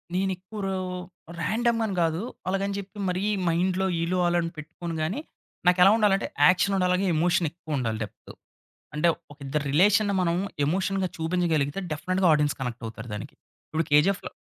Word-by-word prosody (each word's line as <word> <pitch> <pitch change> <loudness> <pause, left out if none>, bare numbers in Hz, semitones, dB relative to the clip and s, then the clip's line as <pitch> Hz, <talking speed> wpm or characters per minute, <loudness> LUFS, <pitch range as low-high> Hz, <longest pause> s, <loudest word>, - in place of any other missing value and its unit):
నేను 190 +1 +1
ఎక్కువ 195 +4 -10
రో 195 0 -1 0.6
రాండమ్ 230 +7 +1
అని 200 -3 -3
గాదు. 165 +1 +1 0.3
అలాగని 195 +1 -1
చెప్పి, 200 +1 -8
మరీ 180 +1 -1 0.2
మైండ్‌లో 180 +3 +1 0.2
ఈళ్ళు, 175 +2 0
ఆళ్ళు 175 0 +2
అని 165 0 -3
పెట్టుకొని 165 +2 -6
గాని, 175 - -1 0.5
నాకు 180 0 +5
ఎలా 195 - +8
ఉండాలి 210 -3 +4
అంటే, - - -4 0.2
యాక్షన్ 185 +2 +3
ఉండాలిగా, 180 +1 +2
ఎమోషనెక్కువుండాలి 155 -8 0
డెప్త్. 105 - -11 0.7
అంటే 155 +3 +3 0.2
ఒక 145 - -16
ఇద్దరి 145 +2 -1
రిలేషన్‌ని 205 +5 +4
మనం 170 -1 +1 0.3
ఎమోషన్‌గా 190 +3 0
చూపించగలిగితే, 160 -1 0
డెఫినిట్‌గా 185 +4 +1
ఆడియన్స్ 150 -2 +2
కనెక్టవుతారు 115 -2 -6
దానికి. 105 - -7 0.3
ఇప్పుడు 160 +1 -1
'కేజీఎఫ్‌లో' 150 +7 +3
180 Hz, 150 wpm, -26 LUFS, 155-195 Hz, 0.7 s, ఎలా